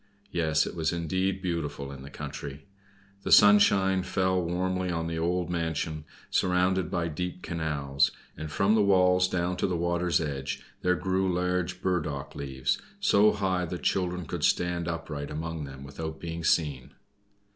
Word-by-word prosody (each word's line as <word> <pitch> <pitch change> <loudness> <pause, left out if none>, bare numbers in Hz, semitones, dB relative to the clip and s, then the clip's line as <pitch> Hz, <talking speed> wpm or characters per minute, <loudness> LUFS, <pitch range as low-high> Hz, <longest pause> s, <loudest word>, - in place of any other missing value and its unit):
Yes; 80 -3 +2
it - - -6
was 80 -2 0
indeed 95 +3 -1
beautiful 75 -6 -3
in 70 -1 -9
the 70 - -9
country! 70 +2 -7 0.6
The - - -4
sunshine 100 -2 +6
fell 95 0 +1
warmly 90 +2 -1
on 80 -1 -1
an 80 - -2
old 90 +1 0
mansion, 80 -2 -2 0.3
surrounded 90 -1 +2
by 85 -1 -1
deep 90 +3 -4
canals, 75 -4 0 0.3
and 80 -1 -6
from 100 +6 +3
the 110 - +4
walls 90 -2 +4
down 90 0 -1
to - - +1
the 90 -2 -1
water's 85 +1 +1
edge 70 -3 -3 0.2
there 90 0 +2
grew 95 +1 0
large 90 0 -1
burdock 75 -7 -1
leaves, 65 -2 -2 0.2
so 105 +1 +5
high 95 -3 0
that 90 +1 -6
children 90 -2 0
could - - -4
stand 90 -1 +1
upright 80 -4 -4
among 80 0 -4
them 70 -1 -9
without 80 +3 -6
being 85 0 -5
seen. 70 -6 0
85 Hz, 155 wpm, -28 LUFS, 80-90 Hz, 0.6 s, sunshine